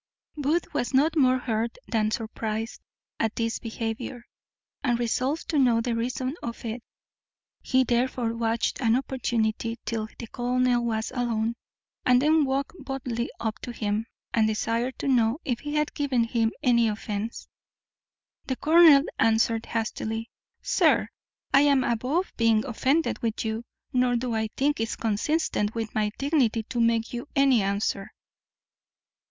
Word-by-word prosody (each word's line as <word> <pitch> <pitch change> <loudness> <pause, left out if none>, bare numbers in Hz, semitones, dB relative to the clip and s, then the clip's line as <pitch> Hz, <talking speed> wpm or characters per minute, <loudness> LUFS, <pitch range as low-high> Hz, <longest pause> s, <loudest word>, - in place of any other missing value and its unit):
Booth 305 +4 -1
was 245 +2 -1
not 305 +5 +3
more 260 -4 +4
hurt 230 -1 -2
than 215 -2 +1
surprized 220 0 -4 0.4
at 225 -1 0
this 230 -1 -1
behaviour, 230 +1 -5 0.6
and 245 -4 +2
resolved 255 +6 -1
to 305 - +2
know 245 -4 +4
the 235 +1 -1
reason 255 +3 -2
of 235 0 -6
it. 230 +2 -4 0.8
He 260 0 +3
therefore 245 -1 0
watched 230 +1 -1
an 230 -2 +3
opportunity 230 -3 -1
till 220 -2 -2
the 235 - -6
colonel 245 +1 +1
was 220 -1 -1
alone, 235 -3 -1 0.5
and 250 0 +5
then 305 +2 +4
walked 275 +4 -2
boldly 250 -3 -3
up 220 -1 -3
to 245 - -6
him, 215 -1 -2 0.3
and 220 -2 +3
desired 230 +3 -1
to - - -4
know 240 -2 +3
if 245 -3 -1
he 295 0 -5
had 300 0 0
given 270 -5 +1
him 230 -1 +1
any 235 -2 +4
offence? 210 +1 -4 1.0
The 260 - -1
colonel 315 -1 +7 0.2
answered 225 0 +2
hastily, 225 0 -3 0.3
"Sir, - - +3 0.4
I 275 - +7
am 280 -2 +4
above 255 +11 -1
being 225 -2 +3
offended 270 +6 +1
with 225 -1 -2
you, 220 +2 -3 0.3
nor 250 -1 +3
do 240 0 -1
I 220 0 0
think 290 0 +1
it 225 0 -2
consistent 225 0 0
with 225 -1 -3
my 210 -1 +1
dignity 270 -6 +1
to 240 +1 -2
make 230 0 +1
you 240 +3 -5
any 275 -5 +4
answer." 195 0 -1
235 Hz, 145 wpm, -26 LUFS, 225-260 Hz, 1.0 s, colonel